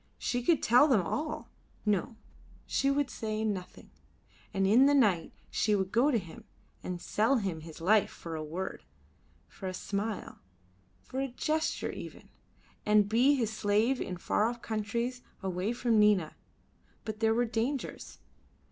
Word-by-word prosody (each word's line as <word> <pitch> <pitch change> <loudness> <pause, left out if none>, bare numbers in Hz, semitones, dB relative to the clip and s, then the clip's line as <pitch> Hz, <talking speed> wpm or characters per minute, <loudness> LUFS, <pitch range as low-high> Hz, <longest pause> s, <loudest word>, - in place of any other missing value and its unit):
She 245 - -1
could 315 +5 +2
tell 250 +6 +6
them 230 - +3
all 305 - -3 0.3
no, 210 +2 0 0.5
she 275 - +1
would 280 0 +1
say 215 -1 -3
nothing, 195 -4 -5 0.6
and 195 -2 +1
in 235 +8 +6
the 285 - +4
night 205 -11 +3 0.2
she 210 -1 +2
would 190 -1 -1
go 245 +6 +4
to 255 - +3
him 195 +3 -8 0.4
and 180 -1 -4
sell 220 +9 +1
him 195 -9 -1
his 160 0 -10
life 205 +5 +3
for 165 -1 -7
a 155 - -4
word, 175 +5 -5 0.6
for 95 - -8
a 185 - -4
smile, 205 +2 -4 0.6
for 260 - -5
a 270 - 0
gesture 310 +5 -1
even, - - -9 0.5
and 210 -1 +4
be 250 +6 +4
his 225 -5 -1
slave 220 +5 +1
in 180 - -4
far 210 +4 +1
off 240 0 -7
countries, 235 +3 -2 0.2
away 190 +3 -1
from 240 -2 +2
Nina. 205 -6 +3 0.7
But 215 -1 -5
there 225 0 +3
were 240 +1 +2
dangers. 235 +4 -3
220 Hz, 155 wpm, -30 LUFS, 195-245 Hz, 0.7 s, tell